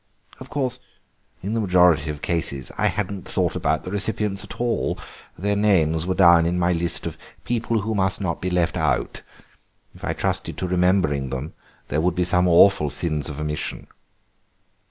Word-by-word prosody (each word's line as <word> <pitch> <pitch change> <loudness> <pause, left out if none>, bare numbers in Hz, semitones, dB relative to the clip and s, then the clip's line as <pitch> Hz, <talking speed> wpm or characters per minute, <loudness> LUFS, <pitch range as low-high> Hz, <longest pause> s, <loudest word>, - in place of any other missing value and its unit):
Of 130 - -10
course 130 -4 -2 0.6
in 100 +3 -2
the 115 - 0
majority 90 -6 +4
of 75 -1 -6
cases 70 -6 -1
I - - +2
hadn't 100 -2 -3
thought - - 0
about 75 +1 0
the 90 - -6
recipients 105 0 -2
at - - -10
all; 120 -1 0 0.4
their 100 +4 0
names 85 -6 +2
were 95 - 0
down 85 -3 +6
in 90 +1 0
my 90 0 +2
list 85 0 -1
of - - -5 0.2
'people 115 -2 -1
who 110 +3 -2
must 95 -2 0
not 95 -5 -3
be 90 - -1
left 90 -2 0
out.' - - -1 0.7
If - - -17
I - - -1
trusted - - -2
to 90 - -2
remembering 90 -6 +1
them 65 +4 -5 0.4
there 75 +3 0
would 90 +1 +1
be 90 - +1
some 90 +1 +2
awful 85 -2 +5
sins 75 0 -2
of 75 -1 -6
omission." 75 0 -4
90 Hz, 175 wpm, -23 LUFS, 80-100 Hz, 0.7 s, down